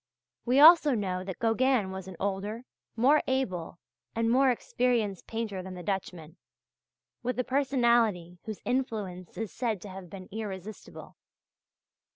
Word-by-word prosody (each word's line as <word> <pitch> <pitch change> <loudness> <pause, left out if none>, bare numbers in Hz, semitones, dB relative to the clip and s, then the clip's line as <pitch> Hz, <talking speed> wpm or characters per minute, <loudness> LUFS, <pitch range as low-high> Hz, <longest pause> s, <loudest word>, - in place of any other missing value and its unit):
We 255 +3 +3
also 310 -3 +8
know 185 -4 -2
that 190 -1 -6
Gauguin 230 -2 +2
was 190 -1 -7
an 190 - -8
older, 200 +4 -3 0.3
more 275 +6 +4
able, 185 -12 -2 0.4
and 230 0 +1
more 265 +2 +5
experienced 235 -5 0
painter 220 -4 -3
than 185 0 -8
the 180 - -8
Dutchman, 175 -4 -4 0.8
with 250 +1 -2
a 250 - +1
personality 235 -10 +1
whose 215 -2 -7
influence 210 -9 -3
is 220 -3 -4
said 230 -5 -1
to 205 - -8
have 185 -2 -9
been 185 0 -9
irresistible. 210 -1 -8
215 Hz, 140 wpm, -29 LUFS, 190-250 Hz, 0.8 s, also